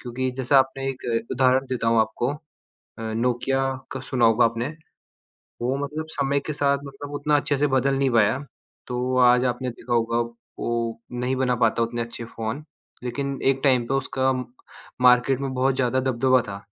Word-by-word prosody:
क्योंकि 130 +1 -3
जैसे 130 +1 -1
आपने 135 0 +3
1 130 -1 -6 0.3
उदाहरण 130 0 +3
देता 125 -3 -2
हूँ 115 0 +4
आपको 110 +3 0
अ, 150 +1 -15 0.5
नोकिया 125 +3 0 0.3
का 135 - -5
सुना 125 -2 0
होगा 115 +2 +4
आपने। 115 +2 0 0.9
वो 130 +3 0
मतलब 155 +2 -5
समय 140 -1 0
के 155 - -2
साथ 140 -1 +1
मतलब 140 +1 -9
उतना 150 +1 +2
अच्छे 145 0 0
से 145 - +3
बदल 135 0 +2
नहीं 135 -1 +2
पाया, 115 +2 +3 0.5
तो 125 +1 -2
आज 125 0 +5
आपने 125 +1 -1
देखा 120 +1 -7
होगा 115 0 +1 0.4
वो 115 -1 -2
नहीं 125 +2 -1
बना 130 -1 +1
पाता 115 +1 +2
उतने 115 +1 -2
अच्छे 115 0 -7
फ़ोन, 115 +6 -5 0.4
लेकिन 135 +2 -3
एक 135 0 +2
टाइम 130 -4 +4
पे 135 - -1
उसका 130 0 +1 0.7
मार्केट 125 +1 +5
में 135 -1 -3
बहुत 130 +1 +2
ज़्यादा 130 0 +1
दबदबा 130 0 +3
था। 100 0 -7
130 Hz, 175 wpm, -24 LUFS, 120-135 Hz, 0.9 s, आज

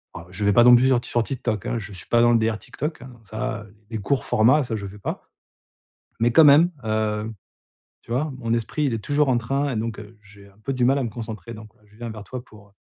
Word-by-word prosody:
alors 85 +1 -10
je 100 +3 -4
vais 105 - +4
pas 120 - +6
non 125 - +9
plus 125 +2 +4
sur 130 -2 +4
ti - - -7
sur 120 -1 +1
TikTok, 115 -6 -3
hein! - - -1
Je 100 -1 -8
suis 95 - -10
pas 120 - +3
dans 120 0 +5
le 115 - +5
délire 110 -1 0
TikTok, 150 -1 -5
hein. 130 - -11
Ça, 110 +1 -4
heu, 105 - -20 0.2
les 110 - -3
courts 125 +6 -1
formats, 130 +7 +4
ça 120 -3 -3
je 100 -2 -5
fais 105 +2 -11
pas. - - -5 1.0
Mais 120 +1 +3
quand 160 +4 +7
même, 155 +5 +7
heu, 110 0 -1 0.7
tu 115 - -8
vois? 150 +5 0
Mon 115 -2 -1
esprit, 120 +6 -2
il 130 - +1
est 115 - -2
toujours 145 +4 +1
en 125 - +3
train 135 +4 -1
et 115 - -3
donc, 110 0 -3
heu, 105 +2 -13
j'ai 100 -1 -16
un 100 - -24
peu 135 - -2
du 125 -1 +1
mal 135 +3 +4
à - - 0
me - - -2
concentrer. 115 0 -7
Donc 110 -1 -11 0.2
je 105 +1 -22
viens 120 0 -6
vers 110 -1 -8
toi 125 +3 -7
pour, 105 -4 -17
heu, - - -29
115 Hz, 275 wpm, -23 LUFS, 105-130 Hz, 1.0 s, non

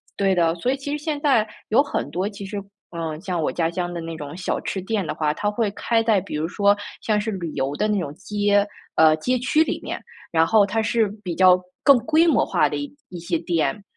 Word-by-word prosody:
对 195 -1 +2
的， 165 -2 +3
所 245 +9 0
以 270 - -1
其 285 +2 -4
实 295 - -7
现 300 -2 -2
在 270 -7 +3 0.2
有 230 +5 +5
很 285 - -3
多， 185 +3 -1
其 200 -1 -9
实， 205 +1 -4 0.4
嗯， 160 -2 -4
像 180 -2 -2
我 - - 0
家 165 -2 0
乡 175 +1 -3
的 170 - -4
那 165 0 -6
种 145 0 -7
小 185 - -2
吃 195 - -3
店 200 0 -2
的 - - -3
话， 150 -1 0
它 205 +5 -1
会 215 0 0
开 225 +3 0
在 220 -3 +3
比 - - -7
如 155 +2 -1
说 200 +3 +3 0.3
像 215 -1 +1
是 220 +1 -3
旅 180 -5 -4
游 135 +1 -2
的 210 - 0
那 210 -2 +1
种 145 -5 -4
街 205 +1 +1 0.3
呃， 160 -1 +6
街 250 +11 0
区 305 +6 +3
里 - - -3
面， - - -4 0.3
然 165 -1 +4
后 210 +3 +4
它 220 +3 0
是 225 0 +2 0.2
比 180 -3 -3
较 185 0 +6 0.2
更 280 -2 +7
规 320 +5 +3
模 325 - +3
化 - - +2
的 - - -3
一 285 -1 -6
一 175 - -7
些 170 0 -1
店。 165 +1 -1
200 Hz, 260 characters per minute, -23 LUFS, 170-225 Hz, 0.4 s, 更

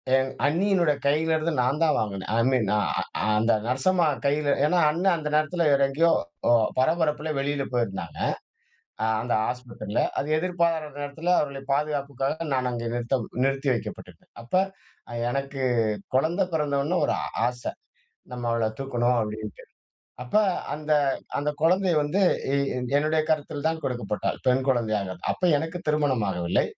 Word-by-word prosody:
என் 130 0 +2 0.2
அண்ணியினுடைய 170 -2 +2
கையிலேருந்து 160 +2 +1
நான் 135 +5 +1
தான் 160 - +3
வாங்கினேன். 100 -3 -3
"ஐ - - +3
மீன் 120 -6 +1
அ - - +2 0.4
அ - - 0
அந்த 115 +1 +3
நர்சம்மா 165 +7 +2 0.2
கையில 145 0 +2
ஏன்னா, 175 +3 +3
அண்ணன் 175 +2 +2
அந்த 150 -1 -4
நேரத்தில 155 +2 +1
வேற 140 0 +3
எங்கேயோ 165 +4 +3 0.4
அ - - +6 0.3
பரபரப்பில 155 +1 +1
வெளியில 140 0 -1
போயிருந்தாங்க. 95 -9 -2 0.8
அ - - +2 0.2
அந்த 120 0 -1 0.2
ஆஸ்பத்திரில. 120 -4 -3 0.2
அது 145 - -3
எதிர்பாராத 170 -4 0
நேரத்தில 160 +5 -1
அவர்களை 140 -2 -3
பாதுகாப்புக்காக 145 +1 -2
நான் 130 -1 0
அங்கே 115 -1 -3
நிறுத்தம் 120 -1 -1 0.2
நிறுத்தி 135 0 0
வைக்கப்பட்டிருந்தேன். 115 - -7
அப்ப 120 - -4 0.6
அ - - -6 0.2
எனக்கு 140 0 -3 0.5
குழந்தை 170 +7 +2
பிறந்தவுன 150 +3 0
ஒரு - - +1
ஆ - - -2 0.2
ஆச. 125 0 -5 0.7
நம்ம 120 -1 -4
அவள 115 -1 +1
தூக்கணும், 125 -2 +1
அப்பிடின்ட்டு. 105 0 -6 0.6
அப்ப 125 +12 0 0.4
அந்த 155 +1 -4 0.5
அந்த 145 +1 0
குழந்தைய 180 +2 +3
வந்து 145 +7 0 0.3
எ-என் 130 -3 -1
என்னுடைய 155 +1 +2
கரத்தில் 150 -1 -1
தான் 160 0 -1
கொடுக்கப்பட்டாள். 120 -5 -2
பெண் 130 +1 +3
குழந்தையாக. 110 -7 0 0.2
அப்ப 180 - -2
எனக்கு 160 +4 -4
திருமணம் 145 -7 +1
ஆகவில்லை. 90 -1 0
140 Hz, 145 wpm, -26 LUFS, 125-160 Hz, 0.8 s, அ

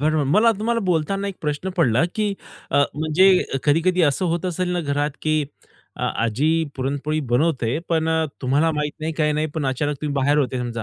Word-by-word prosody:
बरोबर. 155 0 +1
मला 210 +12 +4
तुम्हाला 230 +2 0
बोलताना 185 +4 0
एक 195 - -7
प्रश्न 150 +5 -3
पडला, 130 -7 +3
की 210 -2 0 0.4
अ, 145 - +4
म्हणजे 170 +5 +4 0.2
कधी-कधी 170 +5 +2
असं 145 +3 +2
होत 170 +1 -1
असेल 180 +1 -2
ना, 175 - 0
घरात, 145 -1 -1
की 155 -1 +1 0.5
अ, - - -7 0.2
आजी 115 +6 +1 0.3
पुरणपोळी 140 +3 -2
बनवते, 125 -1 +1
पण 160 -1 +1
अ, 160 0 +2 0.2
तुम्हाला 140 +5 +2
माहीत 150 -1 -2
नाही, 160 +1 -2
काही 150 -1 +1
नाही, 155 +1 0
पण 155 -4 -1
अचानक 145 +2 -1
तुम्ही 150 -2 -2
बाहेर 145 +2 +2
होते 130 -3 0
समजा 120 -2 -4
155 Hz, 190 wpm, -22 LUFS, 140-170 Hz, 0.5 s, मला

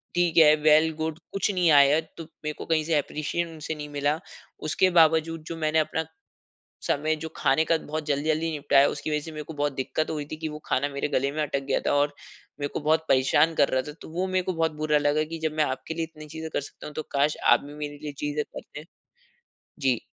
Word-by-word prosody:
ठीक 175 -1 +1
है, 155 -1 +8
well 155 +1 +4
good 160 0 -3
कुछ 195 +1 +1
नहीं 180 -2 +3
आया 145 +1 +6 0.2
तो 165 - -6
मेरे 155 -1 -7
को - - -5
कहीं 160 -1 +1
से 160 0 +1
एप्रीशिएशन 155 +4 -2
उनसे 160 0 -5
नहीं 150 -1 -7
मिला। 145 +1 0 0.5
उसके 185 +4 +3
बावजूद 160 0 +3
जो 165 - -4
मैंने 155 0 +1
अपना, 160 +1 -1 0.8
समय 155 +2 0
जो 160 - -4
खाने 135 +4 +3
का 165 - +2
बहुत 155 0 -5
जल्दी-जल्दी 155 +3 0
निपटाया 145 -2 +4
उसकी 145 +2 -4
वजह 150 - +1
से 160 +2 -9
मेरे 155 -1 -5
को 160 - -9
बहुत 145 0 0
दिक्कत 135 +4 -2
हुई 150 -2 -3
थी 155 - -3
कि 160 0 -4
वो 150 - -7
खाना 140 +2 +1
मेरे 140 0 -3
गले 140 -1 0
में 155 +1 -1
अटक 140 -2 -2
गया - - +2
था - - +2
और 145 0 +2 0.5
मेरे 145 - -1
को - - -1
बहुत 160 +2 +2
परेशान 135 +5 +4
कर 145 -2 +4
रहा 130 0 +1
था। 150 - -5
तो - - -10
वो 180 +3 -1
मेरे 185 0 +1
को 185 - -2
बहुत 165 -2 0
बुरा 150 -1 +3
लगा 145 +1 +2
कि - - -4
जब 160 - +1
मैं 155 - +3
आपके 135 +4 -4
लिए 165 0 -1
इतनी 155 -1 -11
चीज़ें 160 +1 -6
कर - - 0
सकता 140 - -11
हूँ 150 - -9
तो 155 - -3
काश 145 +2 +2 0.2
आप - - +5
भी 145 +1 -10
मेरे 145 -1 -6
लिए 150 -1 -5
चीज़ें 150 0 -1
करते। 150 +1 -10 1.0
जी, 130 -4 +2
155 Hz, 240 wpm, -26 LUFS, 145-160 Hz, 1.0 s, है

